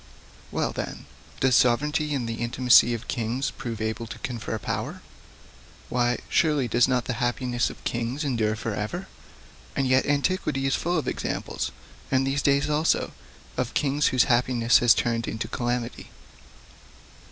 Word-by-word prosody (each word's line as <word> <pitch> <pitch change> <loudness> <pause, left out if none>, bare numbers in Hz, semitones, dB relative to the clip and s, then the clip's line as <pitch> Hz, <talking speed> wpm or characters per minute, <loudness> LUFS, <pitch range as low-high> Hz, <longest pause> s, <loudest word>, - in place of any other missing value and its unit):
'Well, - - -1
then, - - -6 0.4
does 130 -1 +4
sovereignty 150 +5 +2
and 125 -4 -2
the 115 0 -4
intimacy 120 0 +5
of 115 +2 -8
kings 120 +2 -1
prove 120 -3 -6
able 110 +1 -3
to - - -8
confer 115 -2 -4
power? 105 - -4 0.9
Why, 120 0 +1
surely 150 -6 +2
does 120 +2 +3
not 125 -2 +1
the 125 - -2
happiness 120 0 0
of - - -12
kings 120 +5 -2
endure 115 -6 0
for 115 0 -4
ever? 175 - -4 0.7
And 135 - +1
yet 130 +1 +3
antiquity 145 -1 0
is 135 - +1
full 175 +1 0
of 155 - -2
examples, - - -3 0.4
and 130 0 +2
these 135 +1 0
days 140 0 +2
also, 150 +2 +1 0.5
of 125 -1 -2
kings 145 +1 +2
whose 130 -2 +4
happiness 120 -1 +3
has 120 -2 +6
turned 115 -1 0
into 110 - -3
calamity. 120 0 -3
125 Hz, 150 wpm, -26 LUFS, 120-135 Hz, 0.9 s, has